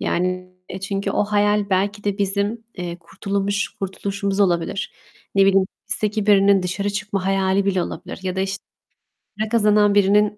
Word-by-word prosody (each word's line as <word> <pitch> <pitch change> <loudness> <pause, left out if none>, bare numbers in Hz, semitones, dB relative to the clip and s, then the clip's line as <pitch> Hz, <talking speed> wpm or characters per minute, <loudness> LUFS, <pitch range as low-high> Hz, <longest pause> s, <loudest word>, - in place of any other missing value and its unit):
Yani 185 +1 -1 0.4
çünkü 195 0 -1
o - - +1
hayal 205 0 +1
belki 200 +2 0
de 205 -1 -1
bizim, 200 +3 -1
eee, 175 -1 -5
kurtulumuş 200 +3 -2
kurtuluşumuz 195 +1 -3
olabilir. 180 +1 0 0.4
Ne 195 0 +5
bileyim, 195 -1 +4 0.2
hapisteki 210 0 -1
birinin 200 -2 +5
dışarı 200 +3 -2
çıkma 200 -2 -3
hayali 195 0 +2
bile 190 -3 +1
olabilir - - -6
ya 185 0 -3
da, 190 - 0
işte 195 +1 -3 0.8
para 215 0 -1
kazanan 210 -2 +4
birinin 205 +1 +4
200 Hz, 150 wpm, -21 LUFS, 190-205 Hz, 0.8 s, Ne